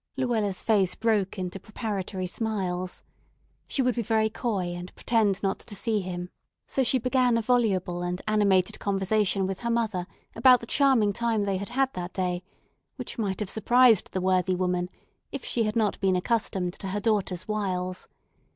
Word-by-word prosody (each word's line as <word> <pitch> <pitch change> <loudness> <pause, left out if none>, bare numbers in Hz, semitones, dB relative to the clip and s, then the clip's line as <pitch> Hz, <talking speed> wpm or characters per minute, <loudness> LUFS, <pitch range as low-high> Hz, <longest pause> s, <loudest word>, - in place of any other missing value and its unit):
Luella's 220 -7 0
face 200 -5 +2
broke 215 -4 0
into 185 +1 -4
preparatory 200 -3 -4
smiles. 185 -3 -3 0.6
She 270 - 0
would 250 0 +2
be 235 - -1
very 220 0 +1
coy, 205 -6 -2
and 175 +1 -7
pretend 210 -4 +1
not 195 -1 0
to 210 - -8
see 220 +1 +1
him; 180 -1 -5 0.3
so 270 - 0
she 260 +1 +4
began 250 -1 +2
a - - +1
voluble 195 -7 +1
and 175 0 -2
animated 200 -4 +2
conversation 195 0 +1
with 190 -1 -3
her 235 - -3
mother 220 -6 -1 0.3
about 250 +2 +6
the 230 - -8
charming 245 -6 +3
time 230 -1 0
they 195 -1 0
had 200 +3 -5
had 265 +2 0
that 180 0 -5
day, 180 -2 -1 0.5
which - - -7
might 195 -4 -1
have 205 - -2
surprised 240 -1 +4
the 185 - -2
worthy 185 0 +2
woman 180 -1 -1 0.4
if 275 - -6
she 230 -2 0
had 215 +1 -2
not 220 -3 +1
been 190 -1 +2
accustomed 185 -2 0
to 195 - -5
her 195 +2 -2
daughter's 205 -5 0
wiles. 185 -4 -2
205 Hz, 175 wpm, -27 LUFS, 185-230 Hz, 0.6 s, about